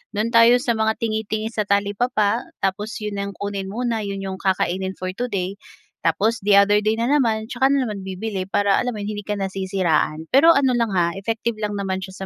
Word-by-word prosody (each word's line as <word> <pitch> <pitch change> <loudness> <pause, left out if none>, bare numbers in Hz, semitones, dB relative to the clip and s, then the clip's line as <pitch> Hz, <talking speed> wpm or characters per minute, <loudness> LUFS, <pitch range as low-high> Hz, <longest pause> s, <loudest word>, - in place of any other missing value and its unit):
do'n 215 +3 0
tayo 230 +1 +7
sa 245 - +1
mga 220 0 +1
tingi-tingi 220 -1 -2
sa 215 - 0
talipapa 205 +2 +1 0.2
tapos 205 +3 -1
'yon 210 -1 -4
ang 200 0 -4
kunin 200 -1 -4
muna, 235 +1 -2
'yon 200 -1 -4
'yong 190 0 -5
kakainin 190 0 0
for 185 0 -4
today. 200 -6 -3 0.5
Tapos 205 +8 +1
the 205 -1 +6
other 205 +1 +5
day 215 +1 +1
na 230 - 0
naman 225 -7 +2
tsaka 265 +2 +2
na 275 -2 +2
naman 205 -2 -5
bibili 190 0 -4
para 200 -1 +2
alam 250 - -1
mo 210 - -6
'yon, 210 - -3
hindi - - -4
ka 210 -1 -2
nasisiraan. 185 -5 -1
Pero 320 +5 +7
ano 265 -2 +3
lang 230 -2 +1
ha, 170 -1 +2
effective 225 +2 -2
lang 210 -1 -2
naman 190 -1 -2
siya 190 +1 -7
205 Hz, 205 wpm, -22 LUFS, 195-225 Hz, 0.5 s, tayo